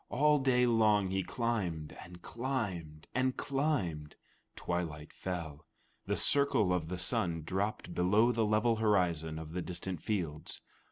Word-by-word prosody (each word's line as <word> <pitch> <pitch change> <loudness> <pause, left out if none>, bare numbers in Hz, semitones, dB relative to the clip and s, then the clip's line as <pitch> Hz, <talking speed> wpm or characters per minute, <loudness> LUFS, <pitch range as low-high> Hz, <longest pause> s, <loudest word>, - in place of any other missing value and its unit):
All 150 +3 +3
day 125 -2 +3
long 105 -5 +3
he 95 0 +1
climbed 95 -10 -2
and 90 +1 -13
climbed 100 - -4
and 130 +1 +1
climbed. 130 - -1 0.4
Twilight 80 -4 -4
fell. 85 -5 -5 0.4
The - - 0
circle 140 -10 +3
of 85 -3 -1
the 90 +2 -4
sun 85 -2 +1
dropped 95 +1 -2
below 105 +7 +3
the 115 -1 +1
level 110 +2 +2
horizon 90 -7 +1
of 80 0 -7
the 90 - -2
distant 90 -1 -4
fields. 85 -8 -3
95 Hz, 135 wpm, -32 LUFS, 85-115 Hz, 0.4 s, All